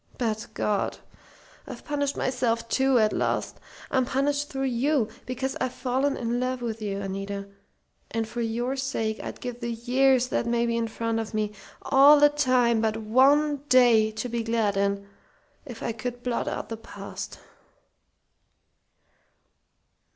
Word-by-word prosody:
But 225 -1 -2
God! 205 -2 0 0.7
I've - - -9
punished 285 -1 -1
myself, 235 -3 0
too, 265 +2 +3
at 215 -2 +3
last. - - -1 0.3
I'm 260 -1 +3
punished 285 +3 0
through 270 -1 -3
you, 260 -1 +1 0.2
because 260 +1 -3
I've 255 - -1
fallen 265 +2 0
in 240 0 -1
love 255 0 -2
with 225 -1 -4
you, 200 -2 -2
Anita, 195 +1 -4 0.6
and 225 0 -2
for 235 +2 -4
your 240 +3 -1
sake 245 -5 -2
I'd - - -7
give 245 -1 -6
the 235 -1 -3
years 255 +2 +2
that 235 - -1
may 235 0 +1
be 235 0 0
in 230 -1 0
front 225 0 -2
of 225 0 -5
me 210 -1 -1 0.3
all 290 +2 +7
time 255 -6 +2
but 220 -1 0
one 275 +7 +4
day 240 -4 +6
to 220 - -3
be 235 -1 -2
glad 225 -3 0
in, 200 0 0 0.6
if 245 -4 -8
I - - -1
could 245 +2 -6
blot 245 -2 -1
out - - -4
the 225 - -4
past!" 225 - -8
240 Hz, 150 wpm, -26 LUFS, 225-260 Hz, 0.7 s, all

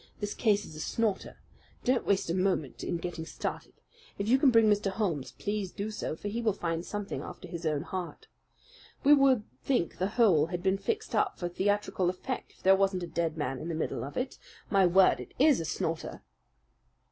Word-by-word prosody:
This 205 -1 -3
case 205 -3 +2
is 155 - -11
a - - -8
snorter. 210 +4 -1 0.5
Don't 250 -1 +1
waste 200 -1 +2
a - - 0
moment 185 -7 0
in 175 - -1
getting 170 -1 -5
started. 160 - -5 0.4
If 200 - -2
you 255 +4 +5
can 275 - +6
bring 230 -2 +5
Mr. 205 -1 +3
Holmes, 190 -9 -2
please 205 -3 -3
do 205 +2 -4
so; 210 - -3
for 205 - -7
he 225 +3 -2
will 220 -3 +2
find 170 -3 -2
something 205 +1 -4
after - - -9
his 170 -1 -4
own 150 -2 0
heart. 185 -3 -6 0.8
We 290 - +7
would 270 -5 +5 0.2
think 245 -11 0
the 185 - +1
whole 180 -10 +5
had 175 0 -4
been 190 0 +2
fixed 440 - -3
up 415 -2 +1
for 175 - -2
theatrical 195 0 0
effect 240 +8 -5
if - - -25
there 190 +1 +7
wasn't 195 -2 +1
a - - -4
dead 165 -2 -2
man 135 -4 -2
in - - -6
the 165 - -2
middle 160 - -2
of 140 - -7
it. 255 +1 -3 0.3
My 195 -2 +5
word! 185 +2 +5
it - - -10
IS 295 0 +5
a 165 - -3
snorter." 160 +1 -3
195 Hz, 205 wpm, -30 LUFS, 170-215 Hz, 0.8 s, We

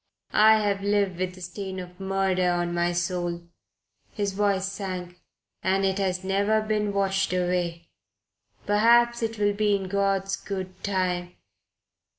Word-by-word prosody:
I 220 +1 +7
have 205 -2 0
lived 200 -3 +1
with 185 0 -2
the 185 - -13
stain 190 +1 -6
of 180 0 -10
murder 190 -1 +1
on 175 0 0
my 175 0 +1
soul" 175 0 -2 0.7
his 200 -2 -2
voice 200 -1 +1
sank 185 -3 -5 0.4
"and 195 +1 +1
it 190 +1 0
has 185 -1 -1
never 200 +3 +2
been 215 -1 -1
washed 195 -1 0
away. 175 -2 -1 0.8
Perhaps 235 +3 +4
it 225 0 -2
will 205 0 +2
be 210 0 +2
in 195 -1 -3
God's 195 0 0
good 185 -2 -6
time.... 180 -2 -1
195 Hz, 145 wpm, -26 LUFS, 180-205 Hz, 0.8 s, I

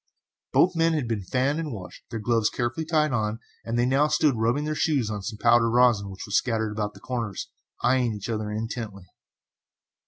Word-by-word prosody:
Both 180 0 +4
men 165 0 +3
had 150 -6 -1
been 115 -3 -1
fanned 130 - 0
and 155 -3 -3
washed, 95 -6 -9
their 115 -1 -4
gloves 115 0 +2
carefully 130 +6 -2
tied 155 -4 +2
on, 110 -2 0 0.3
and 115 +1 -2
they 120 - +3
now 135 +4 +3
stood 150 -1 +3
rubbing 120 +6 +1
their 155 - -1
shoes 140 -8 +1
on 105 -1 -4
some 105 +3 -5
powdered 115 0 +4
rosin 120 -4 +3
which 95 0 -8
was 100 - -3
scattered 110 -3 +1
about 105 -1 -3
the - - -12
corners, 115 -6 -4 0.3
eyeing 125 -1 +3
each 100 - -6
other 110 -2 -2
intently. 110 -2 -5
115 Hz, 195 wpm, -26 LUFS, 105-135 Hz, 0.3 s, Both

